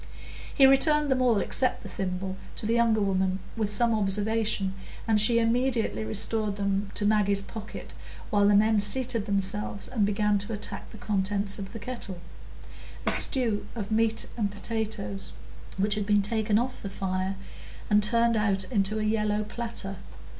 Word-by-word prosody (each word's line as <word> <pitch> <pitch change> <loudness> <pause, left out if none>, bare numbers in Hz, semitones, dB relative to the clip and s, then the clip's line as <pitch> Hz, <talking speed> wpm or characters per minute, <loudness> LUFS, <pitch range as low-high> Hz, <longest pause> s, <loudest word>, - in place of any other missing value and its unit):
He 270 - +7
returned 280 +2 +5
them 255 -1 +2
all 240 -4 +3
except 255 - +1
the - - -7
thimble 190 0 -4 0.2
to - - -4
the 225 - +1
younger 230 -2 +3
woman, 190 -1 +1 0.2
with 215 -2 -1
some 230 +2 +3
observation, 210 -1 0 0.3
and 215 -2 +4
she 230 +2 +4
immediately 235 0 0
restored 215 -1 0
them 200 0 -1
to 205 - 0
Maggie's 205 -2 +2
pocket, 215 +1 -9 0.4
while 205 -1 +4
the 205 - +5
men 215 +1 +4
seated 230 +1 0
themselves, 200 0 -1
and 230 -5 -1
began 210 0 +1
to 205 +3 -2
attack 210 - -4
the - - -12
contents 200 0 0
of 195 -1 -7
the 230 - -7
kettle,—a 205 -6 -7
stew 230 -6 +1
of 215 -2 -5
meat 225 0 +2
and 210 -3 0
potatoes,—which 205 -1 -4
had 210 -1 -2
been 205 -1 +3
taken 215 0 +1
off 250 +2 -2
the 200 - -5
fire 190 0 -2 0.5
and 210 0 +4
turned 230 +2 +3
out 200 -3 +1
into 210 -1 +1
a 215 - -1
yellow 215 -1 0
platter. 215 -3 -5
210 Hz, 160 wpm, -27 LUFS, 200-225 Hz, 0.5 s, He